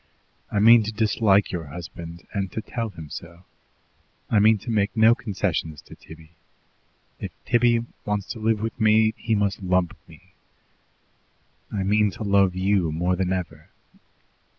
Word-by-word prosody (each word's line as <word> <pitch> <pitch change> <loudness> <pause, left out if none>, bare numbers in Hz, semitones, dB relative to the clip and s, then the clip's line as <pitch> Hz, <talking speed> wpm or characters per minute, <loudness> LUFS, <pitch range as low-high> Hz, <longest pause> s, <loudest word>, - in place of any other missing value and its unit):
I - - -1
mean 115 +3 +7
to 110 +1 -3
dislike 105 -2 +2
your 85 -3 -4
husband, 85 +2 -9
and 100 -2 -2
to 110 - -3
tell 115 -2 -4
him 80 -6 -11
so. 85 +1 -9 0.9
I 110 - +4
mean 110 +1 +5
to 115 +4 -6
make 105 0 0
no 110 +1 +6
concessions 95 -9 -3
to - - -14
Tibby. 80 0 -15 0.9
If - - -5 0.2
Tibby 120 0 +2 0.2
wants 105 -1 -2
to 115 - -6
live 110 -1 0
with 115 +2 -4
me, 110 0 +4
he 115 -1 -1
must 100 -2 -1
lump 90 -2 0
me. 90 +3 -18 1.4
I 100 -2 -2
mean 105 +2 +2
to - - -5
love 100 -2 +3
YOU 95 -3 +1
more 90 +3 0
than 90 0 -1
ever. 90 -2 -5
100 Hz, 155 wpm, -24 LUFS, 90-110 Hz, 1.4 s, mean